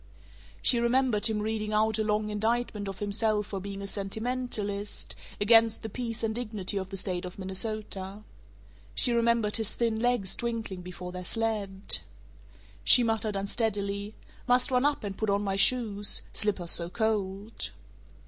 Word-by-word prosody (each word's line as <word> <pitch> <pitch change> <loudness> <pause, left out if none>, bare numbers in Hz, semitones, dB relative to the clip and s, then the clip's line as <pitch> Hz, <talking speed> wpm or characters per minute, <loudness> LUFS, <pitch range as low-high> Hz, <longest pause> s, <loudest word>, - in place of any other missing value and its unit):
She 240 - +6
remembered 235 -2 +3
him 220 -1 -1
reading 215 0 -2
out 220 0 +2
a - - +2
long 210 0 0
indictment 220 -1 -1
of 195 -1 -5
himself 210 +1 +1
for 195 -1 -5
being 200 +1 -6
a - - -4
sentimentalist, 205 0 -3 0.3
against 225 +1 +5
the 220 - -4
peace 230 0 -4
and 220 -1 0
dignity 215 -4 -3
of 190 -1 -4
the 195 - -5
State 185 -2 -1
of 180 0 -8
Minnesota. 200 0 -2 0.7
She 240 - +3
remembered 235 -2 +2
his 220 -1 0
thin 230 -2 0
legs 240 -5 +1
twinkling 225 -6 -4
before 180 0 -8
their 180 0 -6
sled 210 -2 -2 0.8
She 245 - +8
muttered 220 -2 -1
unsteadily, 200 0 -2 0.3
"Must 250 +1 +4
run 250 +1 +2
up 290 -4 +1
and 200 -2 -4
put 220 +1 -2
on 200 +1 +1
my 195 -1 -1
shoes 205 -2 +3
slippers 195 -5 +2
so 170 0 +2
cold." 210 0 -2
210 Hz, 155 wpm, -28 LUFS, 200-230 Hz, 0.8 s, She